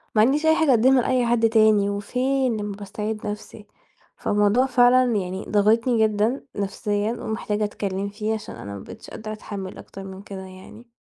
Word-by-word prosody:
ما 215 Hz, -, +5 dB
عنديش 280 Hz, +7 st, +3 dB
أي 315 Hz, 0 st, +5 dB
حاجة 320 Hz, -2 st, +2 dB
اقدمها 255 Hz, +2 st, +5 dB
لأي 250 Hz, 0 st, +1 dB
حد 230 Hz, -1 st, +3 dB
تاني، 215 Hz, -2 st, +4 dB
وفين 250 Hz, +4 st, 0 dB
لمّا 205 Hz, -1 st, -4 dB
باستعيد 210 Hz, +1 st, -5 dB
نَفسي، 210 Hz, 0 st, -7 dB, 0.5 s
فالموضوع 210 Hz, +5 st, +2 dB
فعلًا 255 Hz, 0 st, +5 dB
يعني 190 Hz, 0 st, -4 dB
ضاغطني 220 Hz, +3 st, +3 dB
جدًا 215 Hz, +5 st, -1 dB
نفسيًا، 205 Hz, +1 st, -1 dB
ومحتاجة 220 Hz, -2 st, -3 dB
أتكلّم 200 Hz, -1 st, -3 dB
فيه، 215 Hz, +2 st, -3 dB
عشان 220 Hz, -, -8 dB
أنا 100 Hz, -, -8 dB
ما -, -, -7 dB
بقيتش 225 Hz, -, -11 dB
قادرة 215 Hz, -1 st, -7 dB
أتحمل 200 Hz, -3 st, -7 dB
أكتر 195 Hz, -, -10 dB
من 190 Hz, 0 st, -9 dB
كده 195 Hz, -1 st, -8 dB
يعني. 190 Hz, +5 st, -12 dB
215 Hz, 170 wpm, -23 LUFS, 205-240 Hz, 0.5 s, ما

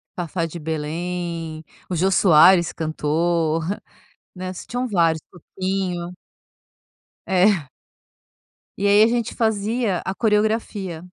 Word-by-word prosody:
Fafá 170 Hz, -1 st, -2 dB
de 165 Hz, +1 st, -7 dB
Belém, 165 Hz, +1 st, -4 dB, 0.3 s
o 180 Hz, -, -2 dB
Jô 190 Hz, +4 st, +2 dB
Soares 175 Hz, -1 st, +6 dB
cantou, 160 Hz, +1 st, 0 dB, 0.7 s
né, 185 Hz, 0 st, -5 dB
tinham 245 Hz, +7 st, -4 dB
vários, 165 Hz, -6 st, +2 dB
Toquinho. 180 Hz, 0 st, -4 dB, 1.1 s
É. 185 Hz, -5 st, +3 dB, 1.1 s
E 200 Hz, -, -1 dB
aí 205 Hz, +1 st, +6 dB
a 220 Hz, -, +7 dB
gente 235 Hz, -1 st, -1 dB
fazia 220 Hz, -2 st, 0 dB
a 190 Hz, -, -2 dB
coreografia. 210 Hz, -5 st, 0 dB
180 Hz, 100 wpm, -22 LUFS, 165-200 Hz, 1.1 s, a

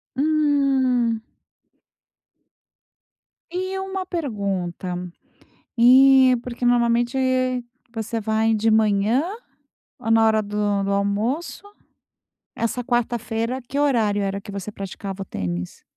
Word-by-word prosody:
Hum. 270 Hz, -6 st, +2 dB, 2.3 s
Eh, 375 Hz, +1 st, -3 dB
uma 385 Hz, -1 st, -4 dB
pergunta, 200 Hz, -, -3 dB, 0.8 s
eh, 260 Hz, +1 st, +7 dB
porque 245 Hz, 0 st, -5 dB
normalmente 240 Hz, +1 st, +2 dB, 0.8 s
você 225 Hz, 0 st, -3 dB
vai 220 Hz, +1 st, +1 dB
de 220 Hz, +1 st, +1 dB
manhã 215 Hz, +4 st, +2 dB, 0.8 s
ou 225 Hz, -, -4 dB
na 225 Hz, 0 st, +5 dB
hora 220 Hz, -1 st, +3 dB
do 205 Hz, -1 st, -1 dB
do 200 Hz, -, -2 dB
almoço, 210 Hz, -, -1 dB, 0.9 s
essa 235 Hz, +2 st, -2 dB
quarta-feira 240 Hz, 0 st, -1 dB
que 270 Hz, +4 st, -4 dB
horário 225 Hz, -8 st, +2 dB
era 195 Hz, 0 st, -2 dB
que 200 Hz, 0 st, -10 dB
você 200 Hz, +1 st, -6 dB
praticava 195 Hz, 0 st, -7 dB
o -, -, -15 dB
tênis? 90 Hz, -, -5 dB
230 Hz, 100 wpm, -22 LUFS, 205-260 Hz, 2.3 s, eh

